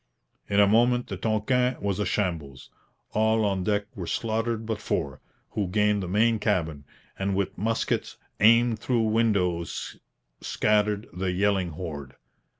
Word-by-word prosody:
In 100 - +2
a 100 - +7
moment 120 +4 +3
the 95 - -3
Tonquin 120 +5 +1
was 100 -1 -2
a 105 - 0
shambles. 80 -9 -3 0.4
All 110 0 +2
on 95 -2 0
deck 105 +1 0
were 90 -6 -5
slaughtered 115 0 -1
but 110 -1 -3
four, 70 -2 -2 0.3
who 100 -3 -1
gained 105 +2 +2
the 90 - -4
main 110 +4 +2
cabin, 80 -9 -1 0.3
and 95 0 0
with 100 -1 -1
muskets 110 +4 -1 0.2
aimed 115 +1 +5
through 120 0 +1
windows 100 -6 0 0.4
scattered 105 0 +1
the 90 +1 -2
yelling 95 -1 +1
horde. 75 -5 -7
105 Hz, 145 wpm, -26 LUFS, 90-110 Hz, 0.4 s, a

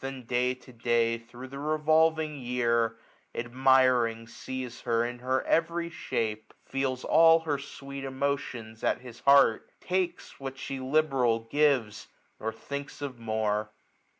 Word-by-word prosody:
And 135 -2 -6
day 125 +1 +1
to 125 0 -17
day, 115 0 +1
thro* 120 +2 -11
the 140 +1 -8
revolving 155 0 +2
year 115 -2 +1 0.4
j - - -1
i - - -5
J05 - - -14
Admiring, 125 -2 +3
sees 130 +1 -6
her 115 -1 +1
in 120 0 -5
her 130 +1 0
every 170 +1 0
shape; 110 -8 -3
Fetls 135 -1 -2
all 165 0 +6
her 150 -3 -1
sweet 140 -1 -8
emotions 130 -5 -3
at - - +1
his 120 -2 -11
heart; 140 -5 +5
Takes 185 -1 -2
what 135 -1 -6
she 135 0 -5
liberal 130 -4 +2
gives, 125 -3 +1 0.3
nor 110 - -2
thinks 140 +6 -7
of 130 -4 -5
more. 110 -1 -1
130 Hz, 150 wpm, -28 LUFS, 115-140 Hz, 0.4 s, all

